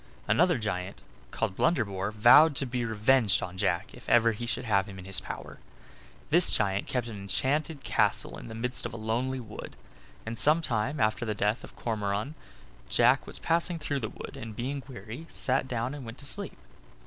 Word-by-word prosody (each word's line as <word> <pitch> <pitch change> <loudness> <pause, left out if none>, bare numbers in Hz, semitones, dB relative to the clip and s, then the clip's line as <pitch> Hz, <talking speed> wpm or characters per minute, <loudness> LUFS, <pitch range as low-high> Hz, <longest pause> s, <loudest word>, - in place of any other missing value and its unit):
Another 175 -2 +4
giant, 95 -4 -3 0.3
called 95 - -2
Blunderbore, 100 - +1
vowed 120 +8 +7
to 140 - -1
be 125 -1 -2
revenged 110 -2 +3
on 90 -1 -6
Jack 90 0 -1
if 120 - -11
ever 115 -1 +5
he 120 +2 -5
should 125 +1 -2
have 100 -2 +2
him 95 -2 -9
in 90 - -9
his 95 0 +2
power. - - -8 0.7
This - - +5
giant 100 -2 +1
kept 125 -2 -1
an 110 -3 -7
enchanted 140 - -1
castle - - +1
in - - -10
the 110 - -8
midst 125 +2 -2
of - - -9
a - - -5
lonely 120 +4 -1
wood; 110 -3 -9 0.5
and 115 0 -3
some 155 +3 +5
time 130 0 -1
after 110 +2 +1
the 110 -2 -2
death 105 +3 0
of - - -12
Cormoran 105 +3 -2 0.6
Jack - - +4
was - - 0
passing 170 +1 0
through 150 -2 -2
a 110 - -3
wood, - - -9
and 115 -5 -8
being 135 +5 -3
weary, 120 +5 -9
sat 130 0 0
down 120 +1 -2
and 145 -2 -7
went 115 +1 -8
to 145 - -7
sleep. - - +1
115 Hz, 195 wpm, -29 LUFS, 105-135 Hz, 0.7 s, vowed